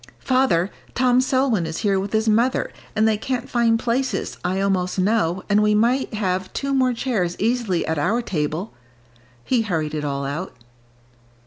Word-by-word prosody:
"Father, 230 -9 +1 0.2
Tom 255 0 +4
Selwyn 255 -9 +1
is 160 - -4
here 195 -2 +3
with 195 +1 -4
his 220 +1 +1
mother, 235 +4 +2 0.2
and 220 +1 +3
they 220 -1 +2
can't 255 +1 -3
find 235 -2 +2
places, 245 +3 -2
I 185 +2 0
almost 190 -2 0
know, 185 -2 +1
and 205 0 +3
we 210 0 +3
might 235 +2 +1
have 190 -3 -1
two 275 0 -2
more 260 -2 +3
chairs 225 -8 -1
easily 225 -5 0
at 160 -1 -1
our 230 +11 +1
table," 160 +2 -3 0.7
he 250 -3 +1
hurried 160 -8 -2
it 150 -1 -3
all 140 -1 -2
out. 145 +3 -4
210 Hz, 165 wpm, -22 LUFS, 180-245 Hz, 0.7 s, Tom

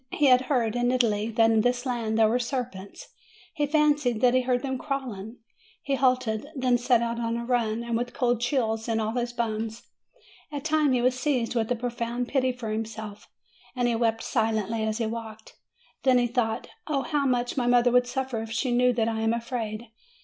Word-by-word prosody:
He 295 - +2
had 255 -2 +6
heard, 240 -5 +1
in 245 0 +1
Italy, 225 -4 +1
that 225 0 +3
in 220 -1 +4
this 245 +2 0
land 230 -3 -1
there 220 -1 +5
were 235 +3 +1
serpents; 240 -6 -5 0.4
he 295 -3 0
fancied 295 -6 +2
that 250 -1 +5
he 255 - +4
heard 250 0 0
them 265 -2 -2
crawling; 250 -6 -5 0.5
he 275 - -1
halted, 255 -3 +1
then 255 -2 +2
set 240 -1 +3
out 235 0 -2
on 230 0 -1
a 235 - -4
run, 235 -2 0
and 235 -1 -2
with 240 +1 -2
cold 245 -2 0
chills 230 -3 0
in 225 -1 0
all 220 0 -1
his 240 0 -2
bones. 225 -1 -3 0.7
At 290 -1 -5
times 310 -3 +2
he 245 -1 +1
was 255 0 +3
seized 255 -4 0
with 230 -1 -1
a - - +3
profound 240 0 -3
pity 260 -2 +1
for 245 -3 -6
himself, 215 -1 -5 0.5
and 245 -1 +1
he 240 - +1
wept 225 -1 0
silently 220 -2 0
as 215 0 -1
he 235 - -1
walked. 220 -1 -7 0.5
Then 260 -2 +4
he 245 - +3
thought, 235 -1 -1 0.2
"Oh 280 -3 0
how 290 -2 0
much 245 -1 0
my 250 -3 0
mother 245 0 +4
would 250 0 +4
suffer 255 -2 -3
if 225 - -6
she 240 +3 -1
knew 250 +1 +3
that 225 -2 0
I 225 -1 -1
am 225 +1 +2
afraid!" 235 -2 -4
240 Hz, 210 wpm, -26 LUFS, 225-255 Hz, 0.7 s, had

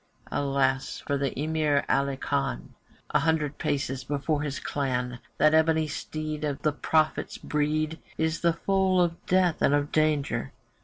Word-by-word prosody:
Alas 135 -1 0
for 145 - 0
the 140 -2 -2
Emir 150 -2 +1
Ali 140 0 +1
Khan! - - -2 0.4
A - - +4
hundred 155 -3 0
paces 135 -2 -1
before 145 +2 -1
his 145 -2 -3
clan, 125 -3 -2 0.2
That 155 0 +5
ebony 160 0 +3
steed 155 0 -4
of 145 -2 -1
the 150 -1 +2
prophet's 155 +1 0
breed 155 +2 -1 0.2
Is 160 0 0
the 170 -1 +3
foal 190 +1 +2
of 170 -1 0
death 180 -3 +2
and 145 - +4
of 145 0 -1
danger. 155 -2 +1
150 Hz, 150 wpm, -27 LUFS, 140-160 Hz, 0.4 s, That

